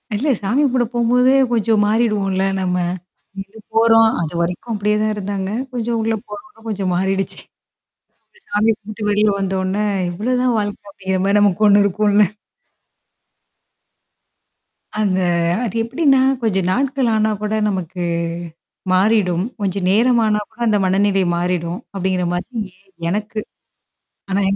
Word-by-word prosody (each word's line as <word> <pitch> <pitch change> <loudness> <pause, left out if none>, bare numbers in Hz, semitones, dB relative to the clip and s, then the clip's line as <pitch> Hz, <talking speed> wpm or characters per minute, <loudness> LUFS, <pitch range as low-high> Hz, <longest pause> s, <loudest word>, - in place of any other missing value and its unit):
இல்ல 270 +9 -1
சாமி 225 +8 0
கும்பட 255 -3 +2
போம்போதே 250 +2 +3 0.2
கொஞ்சம் 220 -1 +2
மாறிடுவோம்ல 210 -4 +1 0.2
நம்ம. 180 -1 -1 0.7
இது 200 +3 -13 0.2
போறோம், 225 0 +5
அதுவரைக்கும் 170 +7 -3
அப்டியே 210 0 0
தான் 215 0 +1
இருந்தாங்க. 200 -1 -3 0.2
கொஞ்சம் 235 -1 -2
உள்ள 225 0 0
போனொண்ணே 210 +2 -11
கொஞ்சம் 195 -4 -2
மாறிடுச்சு. 190 +1 -1 1.1
சாமி 215 +2 +2
கும்ட்டு 210 0 -6
வெளில 210 +1 +3
வந்தோனே 190 +1 -1 0.3
இவ்ளோதான் 250 +5 0
வாழ்க்கை 205 0 -3
அப்டிங்கிற 190 -1 -3
மாரி 200 +1 +3
நமக்கு 205 +1 +3
ஒண்ணு 205 0 +6
இருக்கும்ல. 205 +1 +3 2.8
அந்த 190 -3 +1 0.4
அது 230 -2 -3
எப்டின்னா, 270 +1 +2 0.2
கொஞ்சம் 195 -5 0
நாட்கள் 265 0 0
ஆனா 215 0 +2
கூட 215 +1 -1
நமக்கு 180 -2 -4 0.9
மாறிடும். 190 -2 +2 0.2
கொஞ்சம் 190 -1 -1
நேரம் 235 +3 +3
ஆனா 210 -1 +2
கூட 230 - -26
அந்த 210 -1 +3
மனநிலை 195 0 +2
மாறிடும். 175 0 -2 0.2
அப்டிங்கற 185 -1 -1
மாரி 220 +6 -4 0.5
எனக்கு. 215 +3 -3 0.9
ஆனா 195 +1 +1
205 Hz, 120 wpm, -19 LUFS, 190-225 Hz, 2.8 s, ஒண்ணு